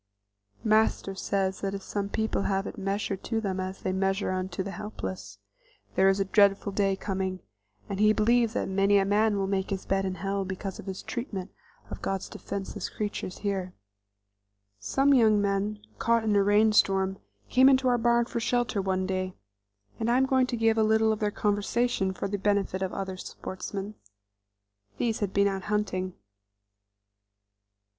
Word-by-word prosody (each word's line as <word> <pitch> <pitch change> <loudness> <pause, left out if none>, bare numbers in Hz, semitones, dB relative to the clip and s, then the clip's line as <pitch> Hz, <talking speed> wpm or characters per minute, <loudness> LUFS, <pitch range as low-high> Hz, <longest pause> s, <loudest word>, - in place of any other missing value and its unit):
Master 215 -2 +2
says 190 0 -1
that 195 0 -2
if 195 - -7
some 200 -1 -3
people 220 -1 -1
have 195 0 0
it - - -6
measured 195 0 -2
to 225 -1 0
them 195 -3 -2
as 185 +1 -5
they 185 - 0
measure 195 +1 0
unto 185 0 -2
the 200 - -5
helpless, 100 - -6 0.6
there 190 +1 +4
is 195 +1 +2
a 195 - +1
dreadful 200 0 +3
day 195 -1 +1
coming; 190 -1 -3 0.5
and 195 - -4
he 215 0 +6
believes 230 +1 +3
that - - -1
many 195 +1 +3
a 195 - +3
man 210 +1 +2
will 195 - 0
make 190 0 -1
his 195 -1 -3
bed 195 0 +1
in 190 -1 -2
hell 195 +2 -2
because 190 0 -5
of - - -10
his 190 -1 -5
treatment 205 -6 -5 0.4
of - - -6
God's 195 -1 -3
defenseless 200 0 -5
creatures 205 -3 -4
here. 190 -2 -2 1.0
Some 270 - +2
young 220 -5 +5
men, 200 +1 0 0.2
caught 230 -1 +2
in 215 -2 +1
a 200 - +5
rain 210 +2 +4
storm, 195 -2 +2 0.3
came 260 +2 +6
into 260 -1 +3
our 245 -1 +3
barn 235 0 +3
for 235 0 -3
shelter 235 -3 0
one 190 -1 0
day, 185 -1 -2 0.6
and 225 - 0
I 240 - +4
am 265 - +4
going 260 -1 +3
to 245 - -2
give 225 0 +3
a - - +4
little 220 0 +3
of 215 - -1
their 210 -2 +1
conversation 205 0 0
for 190 - -4
the 200 0 -3
benefit 200 -1 0
of 190 -1 -1
other 190 -1 -4
sportsmen. 195 +3 -6 1.0
These 230 -2 0
had 205 -3 -1
been 200 0 +3
out 195 -2 -3
hunting. 185 -3 -1
200 Hz, 180 wpm, -28 LUFS, 190-220 Hz, 1.0 s, he